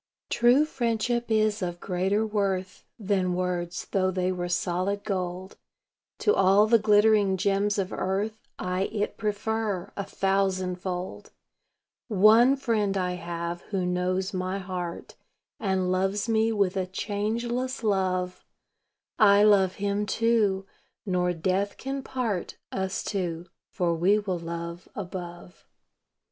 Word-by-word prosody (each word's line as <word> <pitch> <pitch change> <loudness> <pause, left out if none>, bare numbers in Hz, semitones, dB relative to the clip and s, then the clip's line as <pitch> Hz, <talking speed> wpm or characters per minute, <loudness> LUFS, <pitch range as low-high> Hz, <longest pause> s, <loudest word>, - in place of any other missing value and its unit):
True 245 +5 +5
friendship 240 -3 -1
is 215 -1 +2
of 175 -1 -3
greater 190 +4 0
worth 195 -3 -2
Than 190 -4 0
words, 180 -1 -2
though 185 -1 +2
they 185 0 0
were 175 -1 -3
solid 185 +3 -1
gold. 185 -2 -4 0.6
To 420 - +4
all 195 +2 +5
the 230 +1 +5
glittering 210 -2 +4
gems 200 +2 +1
of 190 -2 -2
earth 205 +4 -2 0.2
I 185 +1 -1
it 205 0 -2
prefer, 210 -2 -2
a 200 - -3
thousandfold. 185 -2 -2 0.8
One 225 +5 +6
Friend 215 -7 0
I 180 -1 0
have 170 -1 -4
who 190 -3 -1
knows 185 +2 -1
my 185 +1 -2
heart, 180 -3 -5 0.5
And 190 -3 0
loves 195 +4 0
me 225 0 +2
with 200 -3 +1
a 185 -1 -1
changeless 235 +7 -2
love; 185 -3 0 0.8
I 205 -2 +7
love 195 -3 +4
Him, 205 +1 -1
too 215 -4 +2 0.4
nor 180 -2 +1
death 185 +4 -1
can 270 +1 -4
part 235 -9 -3
Us 190 0 -2
two, 175 -4 -3 0.3
for 175 -5 0
we 180 +5 +3
will 190 -4 -2
love 170 +1 -6
above. 180 -2 -8
195 Hz, 125 wpm, -27 LUFS, 180-215 Hz, 0.8 s, I